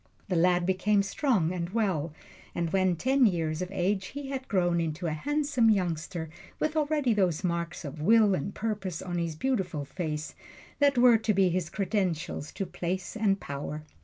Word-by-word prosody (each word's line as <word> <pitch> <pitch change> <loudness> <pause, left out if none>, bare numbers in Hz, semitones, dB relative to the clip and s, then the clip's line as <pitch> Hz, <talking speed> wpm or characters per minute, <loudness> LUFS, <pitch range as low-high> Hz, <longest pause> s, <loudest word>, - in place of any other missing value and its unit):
The 185 - 0
lad 175 +1 +3
became 200 +2 +2
strong 195 - +1
and 175 -2 -3
well, 185 -8 0 0.4
and 170 -1 -1
when 185 -1 +2
ten 260 - +3
years 165 -3 -1
of 180 - -3
age 195 +1 0
he 280 -1 -7
had 265 -1 -4
grown 175 -4 +2
into 165 +2 -3
a 165 - 0
handsome 285 - +1
youngster 175 -4 -1 0.3
with 310 0 0
already 295 -5 +2
those 185 -5 +1
marks 170 -1 -2
of 150 +2 -7
will 215 +3 +5
and 195 +2 -2
purpose 200 -6 -3
on 175 -2 -3
his 165 -2 -2
beautiful 185 - -1
face 155 -1 -4 0.5
that 285 -2 +4
were 240 -2 +6
to 215 -2 0
be 190 -1 +4
his 175 -1 -1
credentials 185 -7 -2
to 195 - -3
place 180 +3 -4
and 205 -3 +1
power. 145 +1 -5
185 Hz, 175 wpm, -28 LUFS, 170-220 Hz, 0.5 s, were